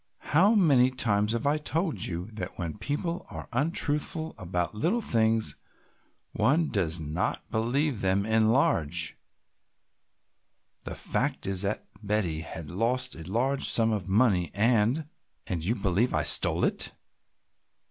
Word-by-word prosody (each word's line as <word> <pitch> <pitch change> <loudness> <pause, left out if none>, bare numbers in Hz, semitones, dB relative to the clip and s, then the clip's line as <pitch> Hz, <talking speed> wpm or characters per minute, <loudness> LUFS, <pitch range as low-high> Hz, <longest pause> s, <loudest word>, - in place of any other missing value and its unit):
"How 195 +9 +5
many 140 -11 +4
times 105 -4 +1
have 115 +2 -2
I 145 +2 +2
told 160 +2 -1
you 85 0 -4
that 95 -4 -7
when 85 +1 -5
people 165 - -3
are - - -8
untruthful 150 +3 0
about 90 -2 -3
little 170 - 0
things 115 - +1 0.7
one 150 +9 +1
does 90 -5 0
not 80 +4 -2
believe 120 +3 0
them 95 +1 +1
in 110 0 +3
large. 85 - +1 1.7
The - - -6
fact - - -2
is 95 -1 +4
that 100 +1 -1 0.2
Betty 100 -7 -1
has 80 -1 -7
lost 120 - -1
a 80 +2 -9
large 135 +5 +1
sum 115 -1 +3
of 100 -4 -3
money 95 -5 +2
and 115 +7 +2 0.2
" - - -45
"And 85 -4 -3
you 110 +7 0
believe 100 +2 0
I 80 - +1
stole 75 - +5
it!" - - -1
110 Hz, 140 wpm, -27 LUFS, 95-135 Hz, 1.7 s, How